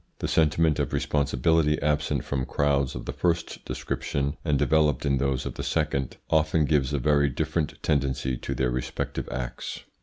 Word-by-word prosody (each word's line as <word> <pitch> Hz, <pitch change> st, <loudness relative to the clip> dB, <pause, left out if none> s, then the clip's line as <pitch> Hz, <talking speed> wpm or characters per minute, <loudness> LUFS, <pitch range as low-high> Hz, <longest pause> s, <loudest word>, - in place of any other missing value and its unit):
The -, -, -3 dB
sentiment 80 Hz, -1 st, +3 dB
of -, -, -1 dB
responsibility 75 Hz, +2 st, +2 dB
absent 75 Hz, 0 st, 0 dB
from 65 Hz, -2 st, -2 dB
crowds 70 Hz, -2 st, +1 dB
of -, -, -6 dB
the -, -, -4 dB
first 85 Hz, -1 st, -1 dB
description 70 Hz, +1 st, -2 dB
and 75 Hz, -4 st, +2 dB
developed 75 Hz, -2 st, +2 dB
in 70 Hz, -2 st, +2 dB
those 70 Hz, -1 st, 0 dB
of -, -, -4 dB
the -, -, -5 dB
second 70 Hz, -2 st, -1 dB
often 80 Hz, -1 st, +3 dB
gives 70 Hz, -3 st, +2 dB
a 75 Hz, -, +1 dB
very 75 Hz, +2 st, +3 dB
different 80 Hz, +3 st, -1 dB
tendency 65 Hz, -3 st, 0 dB
to -, -, -4 dB
their 65 Hz, -2 st, +1 dB
respective 60 Hz, 0 st, -3 dB
acts. 60 Hz, -1 st, -5 dB
70 Hz, 170 wpm, -26 LUFS, 65-75 Hz, -, sentiment